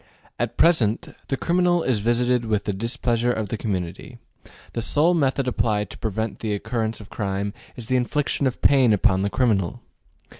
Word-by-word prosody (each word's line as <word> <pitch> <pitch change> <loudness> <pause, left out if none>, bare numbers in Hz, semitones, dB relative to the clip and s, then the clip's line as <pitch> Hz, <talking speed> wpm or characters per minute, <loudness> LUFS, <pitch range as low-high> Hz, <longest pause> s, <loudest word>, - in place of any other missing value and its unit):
At - - -2
present, 120 -10 +3
the 135 - -1
criminal 175 +1 +2
is 125 -5 +1
visited 120 +2 +1
with 105 -2 0
the 105 - -2
displeasure 120 +3 0
of 110 -4 -3
the - - -2
community: 100 - -4 0.6
the 115 - -2
sole 150 +9 +3
method 140 -4 +1
applied 105 -4 0
to - - -10
prevent 110 -1 -3
the 105 -2 -2
occurrence 110 +1 -2
of 105 - -14
crime 100 0 -2 0.2
is 120 - -7
the 130 +3 +1
infliction 140 +2 0
of 130 - -4
pain 130 -5 +5
upon 95 -2 +2
the 100 - 0
criminal. 105 -8 +1
115 Hz, 175 wpm, -23 LUFS, 105-130 Hz, 0.6 s, pain